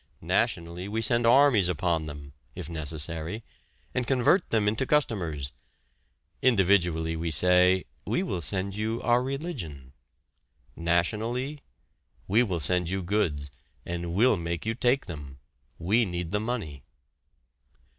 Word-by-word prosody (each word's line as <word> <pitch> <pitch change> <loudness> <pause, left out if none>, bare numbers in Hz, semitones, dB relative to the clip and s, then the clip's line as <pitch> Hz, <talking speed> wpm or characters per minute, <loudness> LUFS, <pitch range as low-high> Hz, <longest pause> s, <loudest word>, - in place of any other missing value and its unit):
Nationally 85 +2 -1
we 110 +2 -2
send 115 +1 +2
armies 120 -7 +5
upon 85 -2 0
them 70 -1 -9 0.2
(if - - -6
necessary) 80 +5 -3 0.5
and 125 -2 -1
convert 135 +8 +3
them 110 -2 +1
into 110 +5 0
customers! 85 - 0 0.9
Individually 90 -8 +3
we 85 +1 -2
say: 90 +4 +4 0.2
"We - - -1
will 90 - -3
send 95 +5 -1
you 110 +2 -2
our 120 0 +3
religion." 125 - -5 0.8
Nationally: 110 - -1 0.7
"We 110 +5 +4
will 95 -8 -1
send 90 +3 0
you 95 0 -2
goods, 80 -8 -1 0.3
and 85 0 -4
we'll 110 +1 +4
make 85 0 -4
you 110 - 0
take 125 +3 +2
them 70 -5 -8 0.4
we 110 +8 +2
need 85 -2 -4
the 105 - +1
money!" 105 - -4
90 Hz, 125 wpm, -27 LUFS, 85-115 Hz, 0.9 s, armies